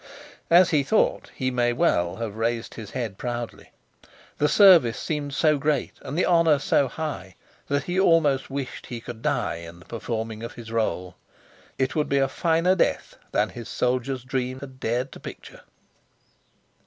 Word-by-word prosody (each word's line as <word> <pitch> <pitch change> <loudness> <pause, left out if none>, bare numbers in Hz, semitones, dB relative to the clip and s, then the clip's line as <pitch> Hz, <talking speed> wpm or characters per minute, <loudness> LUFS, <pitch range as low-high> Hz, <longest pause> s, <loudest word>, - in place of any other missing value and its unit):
As 175 +1 +6
he 150 -3 +4
thought 210 +11 +1
he 130 -1 -1
may 120 -1 +1
well 90 - +1
have 110 -3 -5
raised 115 0 -2
his 110 -4 -8
head 115 -7 -4
proudly. 120 -1 -5 0.7
The 150 0 +3
service 170 - +6
seemed 145 -3 -3
so 150 -1 +3
great 145 -2 0
and 140 +4 -6
the 185 - +3
honor 165 -3 +4
so 140 0 +2
high, 125 -13 -5 0.3
that 140 0 0
he 180 +4 -1
almost 160 -7 +3
wished 135 -1 -5
he 120 - -5
could 115 0 -9
die - - 0
in 85 0 -10
the 90 - -17
performing 115 -1 -4
of 115 - -6
his 115 -1 -10
role. 90 -5 -2 0.6
It 130 -2 0
would 150 - 0
be 140 - +2
a 135 -1 +3
finer 165 +5 +2
death 190 - 0 0.2
than 105 +1 +1
his 120 -2 -9
soldier's 125 +1 -1
dreams 130 0 -3
had 130 -2 -10
dared 125 +3 -1
to - - -11
picture. - - -10
130 Hz, 170 wpm, -25 LUFS, 115-150 Hz, 0.7 s, As